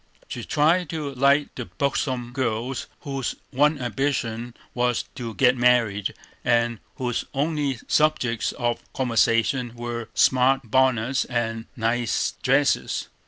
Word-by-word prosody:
She 120 Hz, -, -6 dB
tried 160 Hz, +5 st, +2 dB
to 150 Hz, -3 st, -4 dB
like 140 Hz, +3 st, +3 dB
the 125 Hz, -, -5 dB
buxom 130 Hz, -3 st, -2 dB
girls 125 Hz, 0 st, -2 dB
whose 135 Hz, -4 st, -3 dB, 0.2 s
one 145 Hz, +3 st, +3 dB
ambition 120 Hz, -1 st, -2 dB, 0.2 s
was 125 Hz, -1 st, +1 dB
to 115 Hz, -3 st, -6 dB
"get 125 Hz, -2 st, +4 dB
married," 120 Hz, -5 st, +2 dB, 0.3 s
and 120 Hz, -2 st, +2 dB, 0.2 s
whose 125 Hz, -2 st, -2 dB
only 145 Hz, -3 st, 0 dB
subjects 150 Hz, -7 st, +1 dB
of 120 Hz, -2 st, -1 dB
conversation 120 Hz, 0 st, +1 dB
were 120 Hz, -1 st, -5 dB
"smart 130 Hz, +1 st, +4 dB
bonnets" 130 Hz, -1 st, +2 dB
and 115 Hz, -2 st, -2 dB
"nice 115 Hz, 0 st, 0 dB
dresses." 135 Hz, +2 st, +1 dB
125 Hz, 120 wpm, -24 LUFS, 120-135 Hz, 0.3 s, get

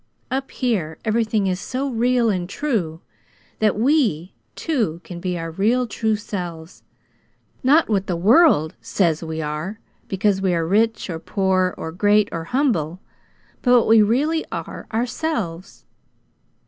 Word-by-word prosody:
"Up 270 Hz, +1 st, -2 dB
here 190 Hz, -, -2 dB
everything 220 Hz, -2 st, +1 dB
is 185 Hz, -1 st, 0 dB
so 260 Hz, +7 st, -3 dB
real 245 Hz, -2 st, +2 dB
and 180 Hz, -2 st, -3 dB
true 195 Hz, -, -2 dB, 0.6 s
that 215 Hz, -2 st, +2 dB
we, 225 Hz, -, +1 dB, 0.2 s
too, 225 Hz, -, -1 dB
can 175 Hz, -2 st, -8 dB
be 180 Hz, 0 st, -2 dB
our 165 Hz, 0 st, -5 dB
real 225 Hz, +9 st, +1 dB
true 220 Hz, -1 st, -1 dB
selves 175 Hz, -5 st, -6 dB, 0.8 s
not 290 Hz, +5 st, +4 dB
what 200 Hz, -3 st, 0 dB
the 180 Hz, -, -1 dB
world 195 Hz, -, +4 dB
SAYS 165 Hz, -5 st, 0 dB
we 160 Hz, -1 st, -4 dB
are 155 Hz, +8 st, -4 dB, 0.3 s
because 195 Hz, 0 st, +1 dB
we 185 Hz, -2 st, +1 dB
are 165 Hz, -1 st, 0 dB
rich, 220 Hz, +5 st, +1 dB
or 165 Hz, -, -4 dB
poor, 185 Hz, 0 st, 0 dB
or 160 Hz, -, -5 dB
great, 205 Hz, +4 st, +3 dB
or 165 Hz, -1 st, -4 dB
humble; 185 Hz, -, 0 dB, 0.6 s
but 250 Hz, -, 0 dB
what 235 Hz, -, +2 dB
we 225 Hz, 0 st, +7 dB
really 285 Hz, +10 st, +2 dB
are, -, -, -6 dB
OURSELVES." 225 Hz, -, -3 dB
205 Hz, 145 wpm, -21 LUFS, 170-235 Hz, 0.8 s, we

